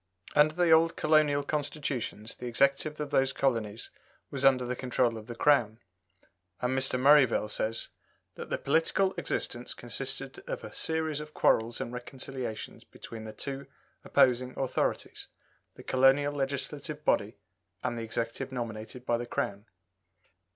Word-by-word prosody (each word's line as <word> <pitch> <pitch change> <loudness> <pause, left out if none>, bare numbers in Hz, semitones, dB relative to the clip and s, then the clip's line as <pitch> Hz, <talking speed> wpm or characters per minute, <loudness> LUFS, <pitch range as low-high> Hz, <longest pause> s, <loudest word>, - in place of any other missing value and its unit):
Under 150 +1 +5
the 175 -2 +3
old 165 +1 +5
colonial 150 -2 +3
Constitutions 140 -7 -3
the 125 - -7
Executive 140 +5 +1
of 150 -2 -4
those 135 0 +3
colonies 115 -6 -1 0.4
was - - -2
under 130 -2 +5
the 125 +1 -2
control 125 -2 +1
of 110 -1 -9
the 120 - -6
Crown; 120 -6 +3 0.8
and 125 +1 0
Mr. 135 -1 +2
Merivale 135 -5 +5
says 110 +1 -1 0.4
"that - - -8
the - - 0
political 165 +6 +2
existence - - -3
consisted - - -4
of - - -4
a - - -8
series 160 -2 -1
of 150 0 -9
quarrels 115 +1 +2
and 120 - -4
reconciliations 125 -2 -6
between 110 -1 -10
the 110 - -6
two 135 +5 -6 0.4
opposing 125 0 +3
authorities 135 -2 -2 0.5
the - - -12
colonial 135 +2 +4
legislative 145 +2 -3
body 105 -5 +1 0.5
and 120 -1 -1
the 115 - -4
Executive 115 +3 -3
nominated 120 0 -6
by 120 - +2
the 120 - -5
Crown." 100 -1 -3
130 Hz, 145 wpm, -30 LUFS, 120-145 Hz, 0.8 s, Under